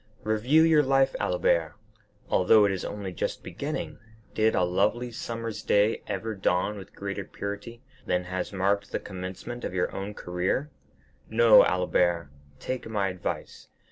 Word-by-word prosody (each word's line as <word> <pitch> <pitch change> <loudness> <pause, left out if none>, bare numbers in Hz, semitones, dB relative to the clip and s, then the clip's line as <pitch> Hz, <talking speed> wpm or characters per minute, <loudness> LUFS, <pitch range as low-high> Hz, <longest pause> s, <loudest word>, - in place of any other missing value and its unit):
Review 120 +9 +3
your 160 -2 +5
life, 135 -1 +2
Albert; 85 -2 +1 0.5
although 105 +3 +5
it 100 - +2
is 95 - -3
only 100 -3 -5
just - - -3
beginning, - - -5 0.3
did 110 0 +2
a - - +3
lovely 105 +7 +1
summer's 115 -2 -5
day 105 +2 +2
ever 105 +2 -3
dawn 95 +1 0
with 95 -1 -11
greater 100 0 -4
purity 100 +5 -7 0.2
than 90 0 +1
has 90 0 -4
marked 100 +1 0
the - - -1
commencement 95 +6 -7
of - - -4
your 90 - +1 0.2
career? 95 +12 -2 0.6
No, 115 0 +7
Albert, 90 -3 +1 0.3
take 130 -2 -4
my 100 -3 0
advice. 90 -1 -5
100 Hz, 140 wpm, -27 LUFS, 90-115 Hz, 0.6 s, No